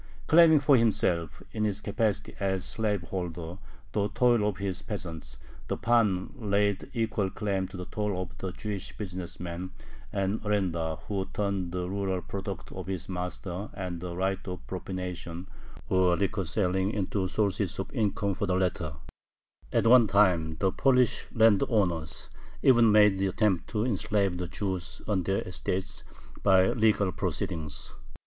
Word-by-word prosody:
Claiming 160 -1 +7
for 140 -1 +5
himself, 85 -8 +1
in 110 - -2
his 105 -1 0
capacity 105 -1 -1
as 95 -2 0
slaveholder, 90 -4 -2 0.3
the 105 -1 0
toil 120 -1 +3
of 105 - -2
his 95 -2 -2
peasants, 80 - -6 0.3
the - - -2
pan 110 -6 +2
laid 100 -4 0
equal 110 -4 0
claim 95 -2 -1
to 95 - -9
the 90 - -5
toil 105 -2 -2
of 90 -1 -5
the 95 - -3
Jewish 100 0 -5
business 95 -4 -6
man 90 +1 -5 0.4
and 100 +2 -1
arendar 85 -7 0
who 95 -2 -2
turned 100 -4 -1
the 90 0 -2
rural 95 -1 -1
products 95 0 -6
of 95 0 -7
his 95 -2 -4
master 90 +2 -4
and 90 -3 -4
the 90 -1 -5
right 95 +1 0
of 90 -1 -6
"propination," 90 -1 -5 0.4
or 90 -2 +3
liquor 100 -1 0
selling, 95 +1 +1
into 100 -2 -1
sources 100 -1 0
of 95 - -5
income 105 -4 0
for 100 +2 -2
the 90 - +1
latter. 90 -5 0 0.8
At - - +2
one 120 -1 +7
time 90 -6 +3
the 95 -1 +2
Polish 125 -1 +2
landowners 100 -8 +2 0.4
even 120 -4 +6
made 105 -2 +6
the 95 - +2
attempt 95 -2 +1
to 110 0 0
enslave 100 -4 0
the 90 - -2
Jews 95 -2 -4
on 100 -3 +1
their 95 +3 0
estates 90 0 -3 0.4
by 95 -1 +5
legal 105 -4 +2
proceedings. 80 -3 -4
95 Hz, 150 wpm, -29 LUFS, 90-105 Hz, 0.8 s, Claiming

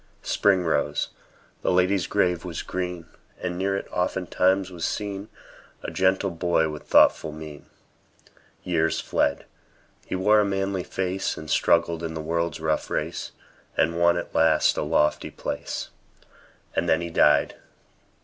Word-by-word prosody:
Spring 95 -3 +2
rose; 80 - 0 0.5
the - - +1
lady's 90 0 +2
grave 90 -4 +1
was 85 -4 -5
green; 90 -2 -4 0.3
And 90 -1 -3
near 95 +2 0
it, - - -6
oftentimes, 95 +1 +1
was 85 -2 -7
seen 100 0 -3 0.5
A - - -4
gentle 95 +1 +1
boy 85 -1 +1
with 75 -1 -8
thoughtful 80 - +5
mien. 75 -1 -10 1.0
Years 80 -2 +1
fled; 70 - 0 0.6
he - - -2
wore 105 +3 +4
a - - +4
manly 95 -1 -1
face, 95 +1 -2
And 80 -1 -7
struggled 85 0 +2
in 80 -1 -4
the - - -4
world's 85 0 -2
rough 80 -1 -1
race, - - -3 0.5
And 85 +1 +2
won 85 0 +4
at - - -5
last 80 - +4
a - - -1
lofty 75 0 +1
place. - - -5 0.9
And - - 0
then 80 - +3
he 85 -1 -5
died! 75 -2 +3
90 Hz, 145 wpm, -25 LUFS, 80-95 Hz, 1.0 s, thoughtful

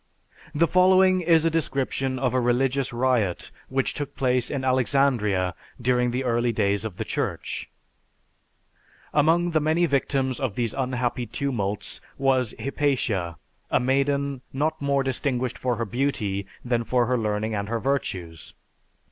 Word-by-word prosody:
The 165 +3 +4
following 185 +1 +5
is 165 -2 +4
a 165 - +3
description 135 -4 -1
of 130 -1 0
a 130 - +3
religious 130 +2 +1
riot 120 -7 0 0.2
which 135 0 0
took 145 -1 -5
place 125 -2 +1
in 135 -2 -3
Alexandria 125 -8 +2 0.3
during 125 0 +2
the 125 +2 -1
early 120 -1 +1
days 100 -2 +1
of 110 -5 -6
the - - -3
Church: - - -3 1.4
"Among 165 +4 +3
the 160 - +3
many 160 +3 +2
victims 135 -3 0
of 130 -8 -2
these 115 -3 -1
unhappy 125 -2 -1
tumults 105 -5 -3 0.2
was 130 -4 +1
Hypatia, 125 - -1 0.3
a - - +3
maiden 140 +1 0
not 150 +4 -1
more 140 -1 +1
distinguished 130 -1 -2
for 125 -1 0
her 115 +1 -2
beauty 105 -5 -1 0.2
than 120 -1 +1
for 125 +1 +2
her 125 +2 +1
learning 110 -1 -1
and 100 0 -2
her 115 0 -1
virtues. 95 - -3
130 Hz, 145 wpm, -25 LUFS, 115-140 Hz, 1.4 s, following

